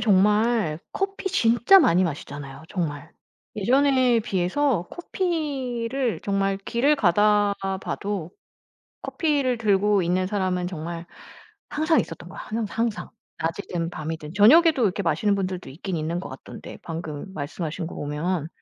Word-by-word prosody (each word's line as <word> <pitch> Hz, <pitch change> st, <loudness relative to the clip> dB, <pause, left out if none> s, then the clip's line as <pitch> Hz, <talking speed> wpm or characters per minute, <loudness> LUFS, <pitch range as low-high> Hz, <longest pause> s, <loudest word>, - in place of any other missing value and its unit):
정말 210 Hz, -4 st, +3 dB
커피 390 Hz, 0 st, -2 dB
진짜 240 Hz, +2 st, +5 dB
많이 185 Hz, -, +4 dB
마시잖아요, 140 Hz, -2 st, -6 dB
정말. 160 Hz, -4 st, -4 dB, 0.5 s
예전에 255 Hz, +1 st, +3 dB
비해서 195 Hz, +1 st, 0 dB
커피를 275 Hz, -, -2 dB
정말 195 Hz, -1 st, +1 dB
길을 250 Hz, +9 st, +1 dB
가다가 200 Hz, -1 st, +2 dB
봐도 195 Hz, -4 st, -4 dB, 0.7 s
커피를 285 Hz, -7 st, 0 dB
들고 205 Hz, -2 st, +3 dB
있는 180 Hz, +2 st, +1 dB
사람은 185 Hz, -3 st, -1 dB
정말 170 Hz, -1 st, -6 dB, 0.6 s
항상 315 Hz, +2 st, +2 dB
있었던 -, -, -7 dB
거야, -, -, -11 dB
항 220 Hz, 0 st, -3 dB
항상 230 Hz, -1 st, -2 dB, 0.3 s
낮이든 165 Hz, 0 st, -3 dB
밤이든. 155 Hz, 0 st, -6 dB
저녁에도 270 Hz, -, +6 dB
이렇게 200 Hz, 0 st, 0 dB
마시는 200 Hz, +3 st, +1 dB
분들도 185 Hz, -2 st, -3 dB
있긴 175 Hz, +5 st, -5 dB
있는 165 Hz, +3 st, -2 dB
것 -, -, -7 dB
같던데, 130 Hz, 0 st, -10 dB
방금 160 Hz, -2 st, -6 dB
말씀하신 160 Hz, +2 st, -4 dB
거 -, -, -9 dB
보면. 155 Hz, +2 st, -2 dB
195 Hz, 295 characters per minute, -24 LUFS, 170-240 Hz, 0.7 s, 저녁에도